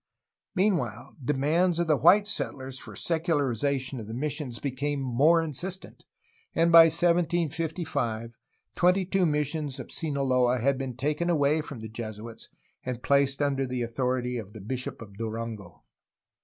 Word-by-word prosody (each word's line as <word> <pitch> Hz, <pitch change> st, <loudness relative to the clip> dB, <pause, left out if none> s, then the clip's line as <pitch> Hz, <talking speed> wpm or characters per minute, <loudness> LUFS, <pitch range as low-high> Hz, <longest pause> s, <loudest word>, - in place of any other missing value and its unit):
Meanwhile, 165 Hz, -, 0 dB
demands 155 Hz, +7 st, +2 dB
of 170 Hz, -, +1 dB
the 155 Hz, -2 st, +3 dB
white 185 Hz, +8 st, +5 dB
settlers 135 Hz, -10 st, -3 dB
for 110 Hz, -5 st, -9 dB
secularization 140 Hz, -, 0 dB
of 110 Hz, -, -8 dB
the 110 Hz, -, -6 dB
missions 145 Hz, -2 st, -3 dB
became 140 Hz, +2 st, -2 dB
more 140 Hz, +6 st, +3 dB
insistent, 175 Hz, +5 st, -6 dB, 0.5 s
and 170 Hz, +1 st, +3 dB
by 165 Hz, -1 st, +10 dB
1755 165 Hz, -7 st, 0 dB, 0.4 s
twenty 180 Hz, +2 st, +3 dB
two 190 Hz, -1 st, +2 dB
missions 150 Hz, -2 st, -2 dB
of -, -, -8 dB
Sinaloa 130 Hz, -5 st, +1 dB
had 130 Hz, +3 st, +1 dB
been 130 Hz, -3 st, -4 dB
taken 150 Hz, +6 st, -1 dB
away 155 Hz, -1 st, +2 dB
from 140 Hz, -6 st, -8 dB
the 110 Hz, -, -6 dB
Jesuits 110 Hz, 0 st, -8 dB, 0.3 s
and 125 Hz, -1 st, -5 dB
placed 140 Hz, 0 st, +2 dB
under 135 Hz, -2 st, 0 dB
the 125 Hz, -1 st, -2 dB
authority 125 Hz, +1 st, -1 dB
of 105 Hz, -2 st, -9 dB
the 110 Hz, -, -9 dB
bishop 125 Hz, +3 st, -5 dB
of 100 Hz, -2 st, -15 dB
Durango. 110 Hz, -4 st, -6 dB
140 Hz, 140 wpm, -27 LUFS, 120-165 Hz, 0.5 s, by